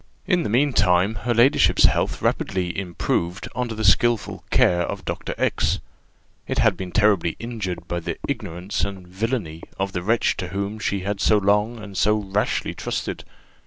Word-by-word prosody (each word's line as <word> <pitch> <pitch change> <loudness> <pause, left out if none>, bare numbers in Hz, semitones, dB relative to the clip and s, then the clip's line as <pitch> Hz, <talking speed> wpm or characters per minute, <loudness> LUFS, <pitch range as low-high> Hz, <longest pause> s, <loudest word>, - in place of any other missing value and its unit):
In 180 -1 +2
the - - -2
meantime 105 -6 +3
her 120 +3 -1
ladyship's 120 +4 +4
health - - +2
rapidly 90 -2 0
improved 90 -1 -2
under 120 -2 -2
the 110 - -3
skilful 110 +3 +2
care 90 -1 +3
of - - -4
Dr. - - -4
X: - - +1 0.7
it - - -2
had - - +4
been 95 -1 -6
terribly 100 -6 +2
injured 110 -6 -5
by 85 - -2
the 85 - -4
ignorance 90 +4 -3
and 95 -3 -4
villany 95 -4 -3 0.2
of 95 0 -1
the 90 - -3
wretch 110 +6 +1
to 90 - -3
whom 100 +3 -4
she 100 -2 -1
had 100 +1 -3
so 110 - +4
long 105 +3 +2
and 105 -3 -10
so 105 +1 +4
rashly 100 0 -1
trusted. - - -4
100 Hz, 165 wpm, -23 LUFS, 90-110 Hz, 0.7 s, ladyship's